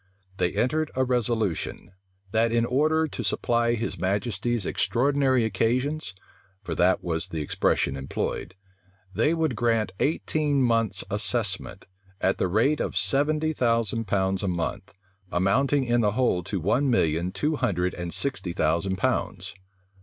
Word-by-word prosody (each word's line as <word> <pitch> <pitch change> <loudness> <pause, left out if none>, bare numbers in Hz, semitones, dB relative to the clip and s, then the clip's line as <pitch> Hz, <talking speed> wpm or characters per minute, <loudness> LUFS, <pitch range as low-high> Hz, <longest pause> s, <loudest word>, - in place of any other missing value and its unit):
They 90 -2 0
entered 155 +4 0
a 130 - +2
resolution, 115 -8 -1 0.4
that, 115 +1 +2
in 115 0 +2
order 155 +6 +2
to - - -5
supply 120 0 +1
his 115 +1 -4
majesty's 105 +3 -1
extraordinary 130 -1 +2
occasions, 125 +1 -1 0.5
(for - - -4
that 90 +1 +2
was 80 -2 -2
the 80 -2 -4
expression 70 -1 0
employed,) 70 +6 -4 0.6
they 155 +9 +2
would 160 -6 0
grant 115 -3 +1
eighteen 150 -2 +1
months' 115 -4 +1
assessment, 100 -2 -3 0.3
at 95 - +1
the - - +2
rate 115 +11 +2
of - - -2
seventy 155 +3 +1
thousand 115 -4 +1
pounds 95 -1 +1
a 100 - -2
month, 85 -3 -3 0.4
amounting 130 +10 +2
in 120 -1 +2
the 105 -2 +2
whole 120 -7 +1
to 95 - -2
one 115 - +1
million 85 -6 +1
two 150 +9 -1
hundred 90 -9 0
and 85 -1 -5
sixty 95 -10 -3
thousand 85 +4 +1
pounds. 95 +2 -1
115 Hz, 140 wpm, -26 LUFS, 95-130 Hz, 0.6 s, a